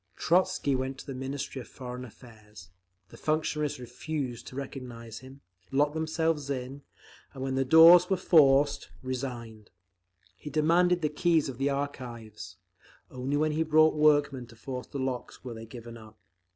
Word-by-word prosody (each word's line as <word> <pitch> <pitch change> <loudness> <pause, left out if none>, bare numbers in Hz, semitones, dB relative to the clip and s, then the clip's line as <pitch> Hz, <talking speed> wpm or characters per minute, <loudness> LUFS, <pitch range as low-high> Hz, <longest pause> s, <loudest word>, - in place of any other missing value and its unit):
Trotzky 180 -4 +1
went 130 +1 -3
to - - -10
the 135 - -6
Ministry 135 +1 -5
of - - -12
Foreign 125 -1 -8
Affairs; 105 -6 -14 0.4
the - - -14
functionaries 155 -2 -1
refused 125 0 -5
to - - -10
recognise 125 -5 -7
him, 130 +2 -14 0.3
locked 145 +2 +2
themselves 160 -2 -1
in, 135 +1 -4 0.5
and 130 - -5
when 135 0 -2
the 135 0 +1
doors 165 +5 +8
were 190 - +2
forced, 145 -5 +4
resigned. 120 -4 -6 0.7
He 150 - -9
demanded 170 +4 +2
the 150 - +2
keys 160 -1 +1
of 130 -1 -8
the 140 +1 +1
archives; 120 -9 -6 0.5
only 130 +3 -2
when 155 +1 +1
he 155 +1 -1
brought 155 0 +4
workmen 145 -4 +2
to 115 - -16
force 125 +2 -7
the - - -7
locks 130 -2 -4
were 125 -2 -6
they 115 0 -9
given 120 0 -10
up. 110 -1 -15
135 Hz, 160 wpm, -28 LUFS, 125-150 Hz, 0.7 s, doors